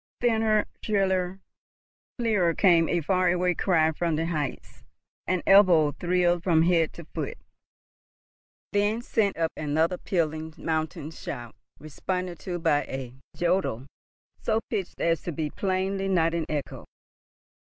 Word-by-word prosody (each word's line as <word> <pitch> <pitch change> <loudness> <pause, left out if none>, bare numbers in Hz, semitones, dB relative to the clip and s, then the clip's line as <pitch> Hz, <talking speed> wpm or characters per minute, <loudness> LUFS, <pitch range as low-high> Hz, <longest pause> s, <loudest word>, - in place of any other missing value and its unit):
Thinner, 220 -3 +2 0.2
shriller, 190 -2 0 0.8
clearer 205 -9 +1
came 170 -4 +4
a 175 - +1
far 185 +3 +2
away 180 0 +2
cry 160 -3 +2
from 165 0 -1
the 160 +2 -1
heights, 155 -5 -4 0.4
and 185 -2 -1
Ebbo 175 -7 +6
thrilled 175 -1 +2
from 165 -3 +3
head 165 -2 +3
to 170 - -10
foot, - - -5 1.3
then 205 +3 +1
sent 210 -5 0
up 165 -1 0
another 160 +4 0
pealing 160 -3 -2
mountain 155 -1 -3
shout, 120 -7 -7 0.2
responded 175 +4 -4
to 175 +4 -4
by 160 -4 +2
a 130 -2 -6 0.2
jodel 175 -9 0 0.6
so 220 0 +1
pitched 195 -5 -3
as 165 -1 +1
to 175 - -4
be 150 -1 -3
plainly 195 0 -1
not 165 -3 +2
an 170 -2 -2
echo. 150 -2 -4
175 Hz, 130 wpm, -26 LUFS, 160-190 Hz, 1.3 s, Ebbo